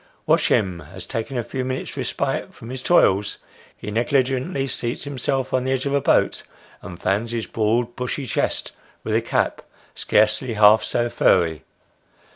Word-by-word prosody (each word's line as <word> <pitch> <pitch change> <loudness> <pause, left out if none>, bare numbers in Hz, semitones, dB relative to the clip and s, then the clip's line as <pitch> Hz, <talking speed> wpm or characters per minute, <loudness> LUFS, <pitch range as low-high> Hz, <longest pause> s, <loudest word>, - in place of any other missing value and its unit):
Watch - - +3
him, 90 -3 +1
as 90 +6 -9
taking 125 +2 -4
a 120 - -1
few 130 +3 -4
minutes' 130 0 -4
respite - - -2
from 115 - -10
his 130 0 -5
toils, 105 - +3 0.4
he 105 - -6
negligently 130 - 0
seats 120 -2 -3
himself 135 -1 -2
on 130 -1 +2
the 130 - -1
edge 130 0 -1
of 140 - -1
a 140 - +2
boat, - - +2 0.4
and 90 -1 -9
fans 105 +5 -1
his 115 -2 -2
broad 115 +2 0
bushy 125 +3 -3
chest - - -1 0.3
with - - -2
a - - +3
cap - - -1 0.3
scarcely 110 +3 +1
half 105 +1 +6
so 120 0 0
furry. 85 -8 +2
120 Hz, 165 wpm, -22 LUFS, 105-130 Hz, 0.4 s, half